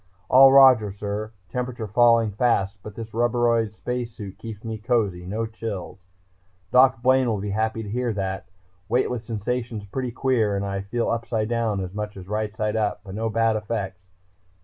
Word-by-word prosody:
"All 135 +1 +8
Roger, 130 -6 +7
sir... 105 +2 -4 0.2
temperature 125 -1 -3
falling 115 +1 +4
fast 100 -3 +1
but 105 0 -10
this 115 -1 -8
rubberoid 115 -2 +1
space 125 +1 -4
suit 105 -4 -9
keeps 110 -2 -8
me 110 -1 -5
cozy, 105 -6 0
no 110 +4 -2
chills... 110 -5 -6 0.7
Doc 125 -2 +5
Blaine 130 0 +4
will 110 -3 0
be 100 +1 -3
happy 110 +2 -1
to 105 - -7
hear 120 +2 -1
that! 95 -1 -3 0.4
Weightless 125 0 0
sensations 115 0 -3
pretty 125 +5 -3
queer 115 -5 +1
and 100 0 -2
I 100 0 -3
feel 115 +5 -2
upside 115 -1 -1
down 115 -4 0
as 90 -1 -5
much 105 0 -5
as 95 - -9
rightside 105 +1 -2
up, 105 -2 -1
but 95 -3 -9
no 110 +2 -2
bad 115 0 +2
effects.... 105 -4 -4
110 Hz, 170 wpm, -24 LUFS, 105-120 Hz, 0.7 s, All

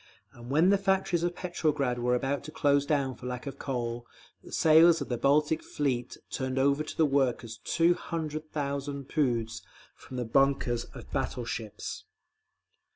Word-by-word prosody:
And 120 0 -11
when 160 +7 +4
the 200 0 +4
factories 190 -3 +1
of 175 0 -1
Petrograd 150 -8 -1
were 125 +1 +2
about 135 +3 -1
to 155 - -7
close 145 -2 +2
down 140 -3 +1
for 125 - -9
lack 125 +1 -5
of 140 - -7
coal, 120 -3 -3 0.4
the - - -13
sailors 160 +1 +6
of 140 - -5
the 120 - -1
Baltic 150 +3 +2
Fleet 130 -4 -2
turned 130 0 -2
over 140 +2 +3
to - - -8
the 160 - +5
workers 130 -5 0
two 170 +1 +3
hundred 155 -3 -5
thousand 140 -1 -3
poods 120 -7 0 0.3
from 130 - -10
the 125 - -2
bunkers 120 -1 +2
of - - -12
battle 125 - -2
ships…. 110 -3 -5
140 Hz, 165 wpm, -29 LUFS, 125-155 Hz, 0.4 s, sailors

